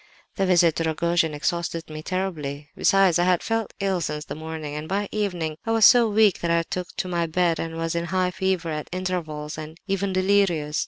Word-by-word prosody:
"The 195 - 0
visit 175 -3 +4
to 165 - 0
Rogojin 165 0 +1
exhausted 170 +2 -2
me 155 0 -7
terribly. 155 -6 -4
Besides, 195 -3 +4
I 175 - +3
had 180 -1 +2
felt 225 -1 -2
ill 195 -2 0
since 150 -1 -3
the - - -6
morning; 155 -1 -6
and 150 +1 -6
by 200 +1 -1
evening 175 -7 -2
I - - -5
was 225 -1 +6
so 240 -3 +7
weak 210 -2 +4
that 170 - -2
I 170 0 +2
took 180 +1 -4
to - - -2
my 170 -2 -1
bed, 170 0 +1
and 165 0 -4
was 165 0 -2
in 170 0 -1
high 185 +1 0
fever 185 -3 -1
at 150 -1 -5
intervals, 160 -5 -4
and 155 +1 -8
even 195 -1 -1
delirious. 185 -6 +1
170 Hz, 210 wpm, -24 LUFS, 160-190 Hz, -, so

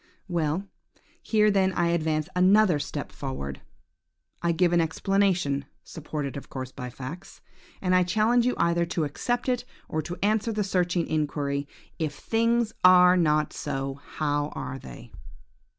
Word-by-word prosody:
"Well! 170 +2 -1 0.5
here 215 -1 +3
then 190 -1 +2
I 170 -1 +1
advance 155 -2 0
another 185 -2 +5
step 145 - -5
forward. 70 0 -6 0.8
I 170 - +2
give 175 +1 +2
an 170 - +4
explanation 175 -4 +1 0.2
(supported 150 -3 -5
of 140 - -8
course 130 -1 -6
by 125 -2 -7
facts), 135 +9 -9 0.4
and 185 -1 +2
I 185 - +5
challenge 220 +7 +3
you 250 - +1
either 170 0 +2
to 170 -1 -1
accept 240 - -2
it, 250 -1 0 0.2
or 155 - -2
to 175 +3 -6
answer 215 +2 +1
the 210 -1 0
searching 180 -3 0
inquiry, 145 -2 -1 0.3
'If 155 -3 -2
things 230 +4 +1
are 180 0 +8
not 155 -4 +2
so, 135 +1 -4
how 145 -1 0
are 130 0 -5
they?' 60 - -11
170 Hz, 150 wpm, -26 LUFS, 145-195 Hz, 0.8 s, are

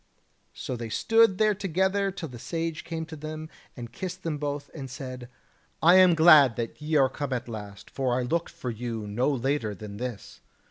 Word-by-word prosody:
So 130 - -4
they 115 -1 -6
stood 225 - +3
there 215 0 +3
together 195 +1 0
till 180 -5 -6
the 120 -2 -10
Sage 165 +3 -3
came 165 -1 -4
up 160 - -11
to 160 - -7
them 155 +1 -7 0.3
and 120 -1 -7
kissed 185 -2 -6
them 155 -3 -2
both, 145 -1 -4
and 135 -4 -7
said: 130 -2 -7 0.5
"I 175 +3 +6
am 185 -2 +7
glad 155 -7 +7
that 115 +5 -5
ye 155 +1 -1
are 135 -3 +5
come 140 0 -4
at 125 - -3
last; 105 -3 -9
for 130 -2 0
I - - -1
looked 170 +7 -1
for 125 - -5
you 115 -1 -5
no 110 +7 0
later 135 -5 -1
than 100 +1 -9
this. 120 -4 -7
145 Hz, 200 wpm, -27 LUFS, 120-165 Hz, 0.5 s, am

